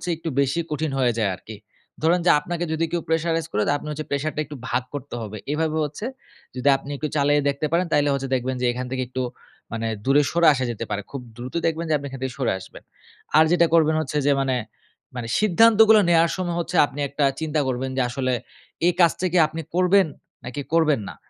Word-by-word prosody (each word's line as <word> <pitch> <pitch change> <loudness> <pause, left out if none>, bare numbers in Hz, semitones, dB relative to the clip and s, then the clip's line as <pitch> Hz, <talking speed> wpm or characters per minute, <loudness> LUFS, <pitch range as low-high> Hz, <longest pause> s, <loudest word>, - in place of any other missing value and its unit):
একটু 165 +1 -5
বেশি 140 +3 +1
কঠিন 150 0 -1
হয়ে 125 -2 +3
যায় 110 -3 +1
আরকি। 110 +4 -11 0.5
ধরেন 165 +3 +3
যে 175 - +6
আপনাকে 175 +3 -4
যদি 160 +1 0
কেউ 175 -1 -1
pressurize 165 0 0
করে, 105 - 0
তা - - +3
আপনি 150 - -10
হচ্ছে 155 +1 -5
pressure 140 +2 -1
টা 155 - -1
একটু 150 - -9
ভাগ - - +1
করতে 145 -2 -6
হবে। 110 -1 -6 0.2
এভাবে 160 0 -1
হচ্ছে 150 +9 -6 0.5
যদি 130 +2 -2
আপনি 135 +1 -12
একটু 155 - -2
চালিয়ে 145 0 +3
দেখতে 140 +2 -2
পারেন 170 +2 +2
তাইলে 145 0 +3
হচ্ছে 135 -1 -3
দেখবেন 130 +1 -2
যে - - +1
এখান 125 +1 -4
থেকে 130 -1 -1
একটু 130 +1 -4 0.5
মানে 115 0 -3 0.2
দূরে 140 +2 +5
সরে 170 0 +3
আসা 130 -2 -1
যেতে 115 0 -5
পারে। 105 -1 -2
খুব 140 - -5 0.2
দ্রুত 125 +1 -7
দেখবেন 165 +1 0
যে - - +2
আপনি 145 - -8
এখান 135 0 -8
থেকে 130 -2 -3
সরে 130 - +1
আসবেন। 95 - -13 0.5
আর 155 - +8
যেটা 175 -1 +5
করবেন 160 -1 +4
হচ্ছে 150 -1 -3
যে 145 - +5
মানে 135 -1 0 0.6
মানে 120 -2 -4
সিদ্ধান্তগুলো 220 +2 +6
নেয়ার 170 -1 +4
সময় 175 -2 -2
হচ্ছে 170 +1 -4
আপনি 145 0 -10
একটা 140 +1 0
চিন্তা 155 -1 -1
করবেন 130 +1 -2
যে - - +3
আসলে, 130 0 -1 0.5
এই 175 - +3
কাজটা 175 +1 +3
কি 180 - +2
আপনি 160 +1 -6
করবেন? 185 +2 +4 0.4
নাকি 125 +3 -5
করবেন 155 -5 +3
না? - - -9
150 Hz, 215 wpm, -23 LUFS, 130-165 Hz, 0.6 s, আর